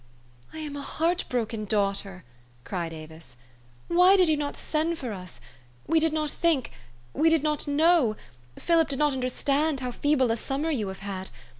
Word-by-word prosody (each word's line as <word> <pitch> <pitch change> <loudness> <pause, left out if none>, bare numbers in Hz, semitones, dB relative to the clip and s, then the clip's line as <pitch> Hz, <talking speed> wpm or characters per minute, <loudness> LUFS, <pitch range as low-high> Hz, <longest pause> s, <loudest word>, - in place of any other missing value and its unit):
"I - - -10
am 300 -2 -5
a 285 - -5
heart 335 +5 -1
broken 225 -3 -2
daughter!" 195 -2 -1 0.4
cried 170 +1 -4
Avis. 160 -4 -11 0.2
" 120 0 -30
Why 360 +3 +6
did 365 -3 +4
}^ou 310 - +4
not 290 -1 -3
send 325 +2 -1
for 245 -7 -5
us? 180 -3 -9 0.5
We 325 +1 +3
did 320 0 +2
not 305 -1 -1
think 325 -7 +1 0.4
did 325 -2 +3
not 300 -1 -1
know 295 -5 +3 0.4
Philip 330 -3 +2
did 275 - 0
not 295 0 +2
understand 275 +3 0
how 250 -1 -3
feeble 265 -1 +2
a 225 - 0
summer 280 +7 -2
you 225 -9 -1
have 190 0 -7
had 190 -1 -5
275 Hz, 175 wpm, -26 LUFS, 205-315 Hz, 0.5 s, Why